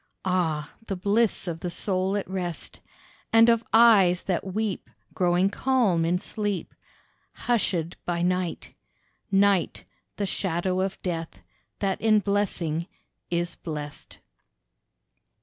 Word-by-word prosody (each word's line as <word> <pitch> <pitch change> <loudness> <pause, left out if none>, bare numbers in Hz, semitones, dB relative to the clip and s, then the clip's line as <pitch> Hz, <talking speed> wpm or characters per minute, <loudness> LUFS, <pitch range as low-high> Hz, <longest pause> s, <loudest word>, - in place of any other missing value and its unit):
Ah! 160 -5 0
the 195 - -2
bliss 205 +2 +1
of 165 -2 -3
the 175 - -3
soul 190 +2 -1
at 200 - -4
rest, 180 -3 -5 0.5
And 225 +1 +7
of 230 -1 +3
eyes 205 -6 +6
that 185 -3 -1
weep 200 +1 -3 0.2
growing 180 +2 +2
calm 220 -11 +2
in 175 +2 +2
sleep, 205 0 -3 0.7
Hushéd 185 -8 0
by 175 -1 -1
night: 180 -1 -1 0.6
Night, 195 -2 +2 0.3
the 205 - -1
shadow 185 -1 -1
of 195 0 -2
death, 165 -3 -4 0.4
that 195 -2 -1
in 220 -1 +4
blessing 185 -5 0 0.4
is 175 0 -1
blessed. 150 -3 -7
185 Hz, 115 wpm, -26 LUFS, 175-205 Hz, 0.7 s, And